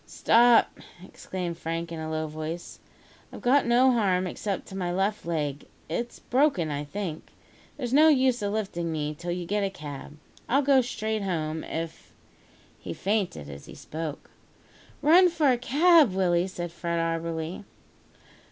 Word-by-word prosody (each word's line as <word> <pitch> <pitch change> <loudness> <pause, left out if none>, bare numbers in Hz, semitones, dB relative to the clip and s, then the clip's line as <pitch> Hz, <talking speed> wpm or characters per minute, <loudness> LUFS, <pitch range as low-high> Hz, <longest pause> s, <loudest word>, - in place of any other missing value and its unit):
"Stop," 235 0 +4 0.3
exclaimed 175 -3 -6
Frank 165 +1 -4
in 165 - -5
a 155 0 -4
low 155 0 -2
voice; 155 +2 -6 0.5
"I've - - -10
got 260 +2 +4
no 250 +2 +5
harm 190 -6 +2
except 195 +2 -4
to 190 - -9
my 180 -2 -2
left 195 +1 -1
leg. 150 -4 -2 0.2
It's 235 +9 -3
broken, 250 - +1
I 145 0 -3
think. 170 -1 -5 0.5
There's 250 -3 -4
no 305 +3 +7
use 260 -5 +3
of 205 -1 -1
lifting 190 -6 -2
me 150 -1 -2
till 170 +3 -7
you 175 0 -2
get 205 +3 -1
a 195 - 0
cab. 145 -3 -9 0.3
I'll 275 +4 +3
go 270 -1 +5
straight 220 -3 -3
home, 160 -4 -2
if 165 0 -6 0.3
" - - -30
He - - -6
fainted 195 - -1
as 70 -1 -10
he - - -11
spoke. 155 -2 -7 0.7
"Run 350 +5 +7
for 310 -5 +2
a 245 - +2
cab, 295 - +5
Willie," 180 -1 +2
said 175 -3 -6
Fred 170 0 -3
Auberly. 165 +1 -2
180 Hz, 160 wpm, -27 LUFS, 165-240 Hz, 0.7 s, no